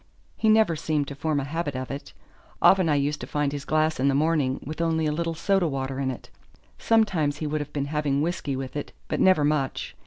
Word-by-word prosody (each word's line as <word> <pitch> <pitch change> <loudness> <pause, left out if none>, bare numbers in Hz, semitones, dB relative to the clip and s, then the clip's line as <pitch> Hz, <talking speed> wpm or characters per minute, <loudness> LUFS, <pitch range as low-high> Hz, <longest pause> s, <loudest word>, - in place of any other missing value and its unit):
He 220 - +1
never 215 -6 +4
seemed 150 -2 -1
to - - -5
form 150 +1 -1
a - - -2
habit 145 0 -3
of 130 0 -4
it. 140 +1 -7 0.5
Often 185 -4 +5
I 150 - +3
used 145 +1 0
to - - -6
find 145 -1 0
his 145 0 -5
glass 155 -1 +1
in 135 - +2
the 135 - +3
morning 145 -3 +1
with 155 +4 -5
only 160 -1 +1
a 150 - +1
little 165 +2 -2
soda 190 +1 +1
water 135 -2 -3
in 135 -1 0
it; 130 - -7 0.5
sometimes 190 -11 +2
he 155 - -4
would 150 0 -1
have 145 0 -7
been 140 -1 -2
having 145 -1 0
whisky 160 -5 -2
with 130 +1 -6
it, 145 - -5
but - - -2
never 185 -5 +5
much. 145 -3 -1
150 Hz, 230 wpm, -25 LUFS, 140-165 Hz, 0.5 s, Often